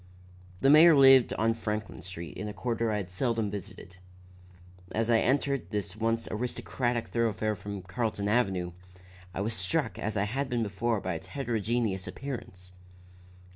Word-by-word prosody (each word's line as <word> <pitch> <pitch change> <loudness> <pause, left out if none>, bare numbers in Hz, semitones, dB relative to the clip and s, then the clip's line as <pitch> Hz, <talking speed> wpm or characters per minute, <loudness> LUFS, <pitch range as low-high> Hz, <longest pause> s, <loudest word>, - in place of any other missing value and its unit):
The 135 - +5
mayor 160 +2 +8
lived 135 -3 +7
on 115 +1 +2
Franklin 105 -2 -4
Street 85 -3 -7
in 105 - -5
a 105 - -5
quarter 115 -1 -1
I 105 - 0
had 95 -3 -5
seldom 115 0 0
visited. 95 -2 -8 1.0
As 115 +1 +1
I 115 - +5
entered 140 0 +1
this 100 -4 -3
once 115 +1 0
aristocratic 120 +1 -2
thoroughfare 110 -2 0
from 100 -1 -7
Carlton 100 +2 -2
Avenue, 95 -6 +1 0.6
I 95 - -4
was 110 +3 -1
struck 115 - -1
as 110 0 -2
I 100 - +2
had 130 +6 -2
been 120 -2 0
before 105 +1 -1
by 95 - -2
its 95 +3 -7
heterogeneous 110 -4 -1
appearance. 90 -5 -7
110 Hz, 155 wpm, -29 LUFS, 95-120 Hz, 1.0 s, mayor